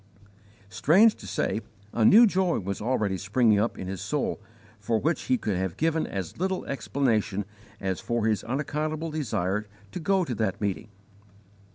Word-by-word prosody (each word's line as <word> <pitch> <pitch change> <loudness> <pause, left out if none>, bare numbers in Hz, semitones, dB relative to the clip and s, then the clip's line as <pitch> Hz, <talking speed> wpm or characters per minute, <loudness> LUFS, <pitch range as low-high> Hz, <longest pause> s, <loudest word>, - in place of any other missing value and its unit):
Strange 185 - +5
to - - -12
say, 110 - -1 0.3
a 115 - +1
new 220 - +8
joy 190 -4 +1
was 100 0 -4
already 105 -5 0
springing 105 +1 +3
up 115 +3 0
in - - -5
his 95 -1 -5
soul - - -2 0.4
for 115 - 0
which 160 +9 -1
he 255 - +2
could 105 - -2
have 95 -1 -2
given 160 0 +1
as 95 - -5
little 190 0 -1
explanation 110 -8 0 0.3
as 95 -2 -2
for 120 -2 -1
his 110 -2 +1
unaccountable 155 +5 -2
desire 105 - -1 0.2
to - - -5
go 190 +2 +1
to 130 - -3
that 110 -4 -1
meeting. 100 +2 -2
115 Hz, 165 wpm, -27 LUFS, 100-160 Hz, 0.4 s, new